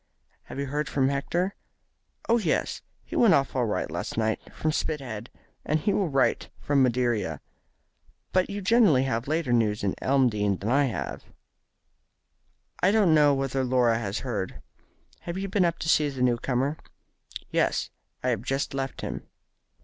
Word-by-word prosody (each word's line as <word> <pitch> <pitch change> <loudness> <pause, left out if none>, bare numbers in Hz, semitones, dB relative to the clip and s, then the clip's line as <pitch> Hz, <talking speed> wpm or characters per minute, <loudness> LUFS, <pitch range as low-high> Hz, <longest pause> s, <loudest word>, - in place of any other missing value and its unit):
"Have - - -9
you 140 - -1
heard 145 +1 -2
from 135 -1 +2
Hector?" 175 +7 -1 0.7
"Oh, 235 +1 +4
yes. 175 -8 -1 0.2
He - - -8
went 215 -8 +6
off 135 -1 0
all 125 -3 +1
right 105 - -2
last - - -4
Wednesday 110 -1 +1
from 155 - -1
Spithead, 130 -8 -3 0.3
and 155 +1 +1
he 200 +6 +1
will 195 -5 +1
write 135 -2 +1
from 145 -1 +2
Madeira. 120 - +1 0.9
But 185 0 +2
you 200 0 -4
generally 195 - +5
have 120 -2 -2
later 155 -4 0
news 110 -3 +1
at 95 - +1
Elmdene 110 -8 +2
than 105 +5 -3
I 140 +2 +4
have." 125 - -4 1.6
"I - - +5
don't 200 -5 +4
know 145 -2 +5
whether 135 -1 -1
Laura 125 -3 +2
has 100 -1 -3
heard. 105 -8 -4 0.6
Have 170 +1 -6
you 195 +1 -3
been 195 -1 +2
up 170 -1 0
to - - -5
see 150 -2 +3
the 130 -2 -3
new 120 -1 +3
comer?" 135 +5 -1 0.7
"Yes; - - +1 0.3
I 130 - +1
have 115 -5 0
just 135 +3 -2
left 135 0 -4
him." - - -5
135 Hz, 165 wpm, -26 LUFS, 120-155 Hz, 1.6 s, went